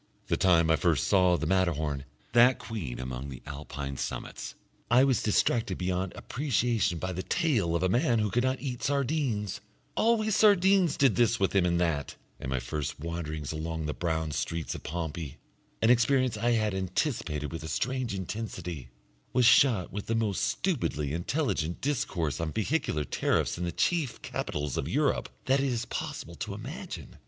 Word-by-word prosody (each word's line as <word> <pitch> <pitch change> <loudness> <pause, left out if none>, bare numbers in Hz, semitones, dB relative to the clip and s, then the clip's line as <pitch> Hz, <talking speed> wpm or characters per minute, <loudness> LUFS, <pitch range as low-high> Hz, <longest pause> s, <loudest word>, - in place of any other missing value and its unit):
The - - +3
time 85 -3 +4
I 80 - +4
first 85 -4 +2
saw 90 -3 +4
the 80 - -3
Matterhorn, 80 -6 0 0.3
that 120 +2 +6
Queen 80 - -5
among 65 +2 -5
the 65 - -9
Alpine 70 -1 -6
summits, - - -5 0.3
I 125 +3 +6
was 135 -3 +3
distracted 105 -1 +1
beyond 90 0 -1
appreciation 120 - 0
by 95 +3 -3
the 90 - -3
tale 115 - +1
of 85 - 0
a - - +4
man 120 +4 +2
who 105 -2 0
could 120 +4 +2
not 130 0 0
eat 125 -4 -4
sardines 135 - -1 0.3
always 215 -2 +2
sardines 195 -5 +5
did 135 -5 +4
this 120 -2 +3
with 95 - +1
him 90 -2 +4
and 85 0 +1
that; 80 -5 -1 0.2
and 65 - -5
my 65 -1 0
first 70 +5 -4
wanderings 80 -2 -4
along 80 0 -3
the 75 - -2
brown 80 -2 -1
streets 80 +3 -2
of - - -7
Pompeii, 80 -2 -5 0.5
an 115 - +6
experience 125 0 +3
I 120 +3 +1
had 110 -3 +1
anticipated 95 - -2
with 80 -1 -5
a 80 - -6
strange 125 - -1
intensity, 90 - -5 0.4
was 125 -1 +4
shot 115 -5 +5
with 105 0 -5
the 115 - 0
most 110 -4 0
stupidly 75 - -1
intelligent 85 - -1
discourse 90 - -1
on 80 -1 -2
vehicular 110 - 0
tariffs - - 0
in 90 - -1
the 85 - -2
chief 140 - 0
capitals 75 -2 -3
of 70 - -1
Europe 140 - +1 0.2
that 135 +1 +3
it 140 - +1
is 120 -3 -1
possible - - -5
to - - -4
imagine. - - -7
95 Hz, 175 wpm, -29 LUFS, 80-125 Hz, 0.5 s, that